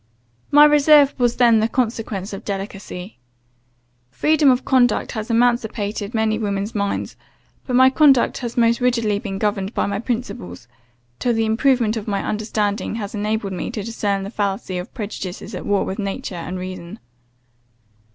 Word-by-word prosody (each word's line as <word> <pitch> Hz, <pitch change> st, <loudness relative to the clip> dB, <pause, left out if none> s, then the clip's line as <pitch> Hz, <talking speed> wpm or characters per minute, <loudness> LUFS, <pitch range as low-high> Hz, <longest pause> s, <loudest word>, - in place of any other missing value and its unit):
My 295 Hz, +1 st, +8 dB
reserve 295 Hz, -1 st, +5 dB
was 240 Hz, -1 st, +2 dB
then 235 Hz, -3 st, +5 dB
the 220 Hz, -, +2 dB
consequence 225 Hz, -5 st, -2 dB
of 195 Hz, -, -7 dB
delicacy. 195 Hz, -, -6 dB, 0.9 s
Freedom 300 Hz, -, +3 dB
of 255 Hz, 0 st, +2 dB
conduct 245 Hz, -4 st, +2 dB
has 220 Hz, +1 st, -5 dB
emancipated 225 Hz, -2 st, 0 dB
many 220 Hz, 0 st, +1 dB
women's 200 Hz, 0 st, -2 dB
minds; 200 Hz, -1 st, -2 dB, 0.5 s
but 250 Hz, -, -1 dB
my 260 Hz, +1 st, +6 dB
conduct 275 Hz, -3 st, +4 dB
has 240 Hz, -2 st, -6 dB
most 235 Hz, 0 st, +3 dB
rigidly 230 Hz, -5 st, +1 dB
been 195 Hz, -2 st, -5 dB
governed 205 Hz, 0 st, -2 dB
by -, -, +1 dB
my 200 Hz, 0 st, -2 dB
principles, 215 Hz, -, -5 dB, 0.5 s
till 240 Hz, -2 st, +1 dB
the 225 Hz, 0 st, +1 dB
improvement 230 Hz, 0 st, +2 dB
of 215 Hz, -, -6 dB
my 200 Hz, -2 st, -1 dB
understanding 210 Hz, 0 st, -2 dB
has 205 Hz, -3 st, -5 dB
enabled 210 Hz, -1 st, -2 dB
me 180 Hz, -, -4 dB
to 210 Hz, -, -5 dB
discern 205 Hz, -3 st, -2 dB
the 200 Hz, -, -6 dB
fallacy 195 Hz, -3 st, -2 dB
of 180 Hz, -, -8 dB
prejudices 200 Hz, -5 st, -6 dB
at -, -, -6 dB
war 205 Hz, -1 st, +1 dB
with 190 Hz, +3 st, -5 dB
nature 195 Hz, -1 st, -4 dB
and 180 Hz, +1 st, -5 dB
reason. 185 Hz, +1 st, -7 dB
215 Hz, 160 wpm, -21 LUFS, 200-240 Hz, 0.9 s, My